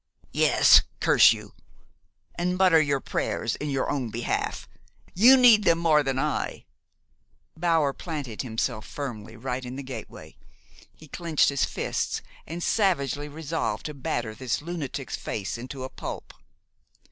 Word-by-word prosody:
"Yes, - - +6 0.2
curse - - +6
you! - - -6 0.8
And 180 +1 -1
mutter 180 -4 +5
your 140 -2 0
prayers - - -2
in 150 - -4
your 135 -1 -1
own 130 -5 -2
behalf. 115 +2 -3 0.5
You 245 +8 +7
need 235 -4 +7
them 165 - +4
more 160 -3 +3
than 135 -2 -2
I." 150 +2 -2 0.9
Bower 160 -4 +1
planted 145 -10 -5
himself 115 -2 -3
firmly, 115 -6 -7
right 125 +2 -4
in 125 +1 -7
the 140 - -6
gateway. 130 -4 -9 0.6
He 155 - -15
clenched 165 0 +1
his 140 -1 +1
fists, - - -3 0.2
and 170 +2 -5
savagely 145 - 0
resolved 145 -7 -3
to 150 - -4
batter 120 -5 -3
this 125 +1 -2
lunatic's 150 -4 -5
face 95 -4 -4
into 130 +3 -7
a 130 - -5
pulp. - - -7
140 Hz, 140 wpm, -26 LUFS, 125-165 Hz, 0.9 s, You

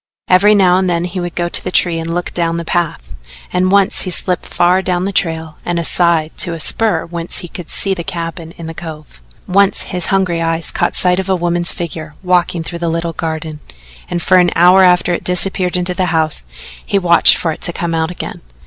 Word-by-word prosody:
Every 200 +3 +5
now 185 -3 +4
and 185 -1 0
then 170 -1 0
he 180 +1 -5
would 175 -1 -5
go 175 0 -1
to - - +5
the - - -3
tree 175 -2 +2
and 165 0 -4
look 175 - -3
down 170 -1 -1
the 170 - -5
path, 155 - -3 0.4
and 185 +1 +1
once 200 -1 +3
he 185 - -3
slipped 180 0 -1
far 180 +2 +2
down 180 -1 -1
the 200 - -2
trail 160 -4 -2
and 175 -1 -2
aside 170 -1 +1
to 175 -5 +1
a - - -8
spur 205 +1 +1
whence 170 0 -4
he - - -8
could 175 0 -9
see 195 - 0
the 175 -3 -5
cabin 165 -2 -6
in 170 - -8
the 165 - -6
cove. 155 - -10 0.3
Once 200 +1 +2
his 180 -3 -3
hungry 185 -3 0
eyes 165 0 -1
caught - - -1
sight 180 0 +2
of 190 0 -4
a 190 - +3
woman's 175 0 0
figure 160 -3 -7
walking 180 -2 +1
through 170 +1 -6
the 170 -1 -1
little 165 0 -2
garden, 160 -2 -5 0.5
and 175 -1 -3
for 185 - +4
an 180 -1 +4
hour 180 +3 +6
after 180 -1 +3
it - - -3
disappeared 180 0 +2
into 180 0 -2
the 185 0 -1
house 160 - +2 0.4
he 200 - -1
watched 175 -3 +4
for 165 - -1
it - - -8
to 175 - 0
come 170 0 -3
out 160 0 0
again. 180 - -7
175 Hz, 225 wpm, -15 LUFS, 165-180 Hz, 0.5 s, hour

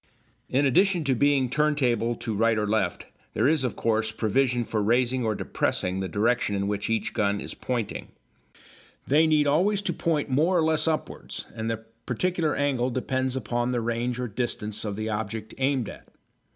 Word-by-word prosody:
In 140 +3 +2
addition 180 +6 +3
to 140 -2 +2
being 140 +1 +3
turnable 125 -5 +1
to 115 - -2
right 115 +2 +2
or 105 - +1
left, 105 -4 0 0.3
there - - +3
is, 155 -2 +2
of 125 - -1
course, 110 -1 0
provision 120 +3 +1
for 110 -2 -1
raising 120 +4 +2
or 110 -2 0
depressing 90 -1 -1
the 95 - -2
direction 105 +1 +1
in 100 0 -1
which 100 +1 -2
each 115 -1 -1
gun 100 -1 +1
is - - -6
pointing. 120 -5 -3 1.0
They 155 +4 +4
need 155 -1 +3
always 190 +8 +2
to 175 - -1
point 160 -2 0
more 155 +7 +2
or 165 - +3
less 160 0 +1
upwards, 160 -1 -3
and 110 +1 -3
the 110 0 -4 0.2
particular 165 +4 0
angle 130 -3 +1
depends 130 +1 -1
upon 120 0 -1
the 120 - +1
range 120 +2 -2
or 125 - -2
distance 105 -2 -3
of 105 -2 -3
the 110 +1 -3
object 110 0 -4
aimed 130 -4 +1
at. - - -10
125 Hz, 180 wpm, -26 LUFS, 110-145 Hz, 1.0 s, They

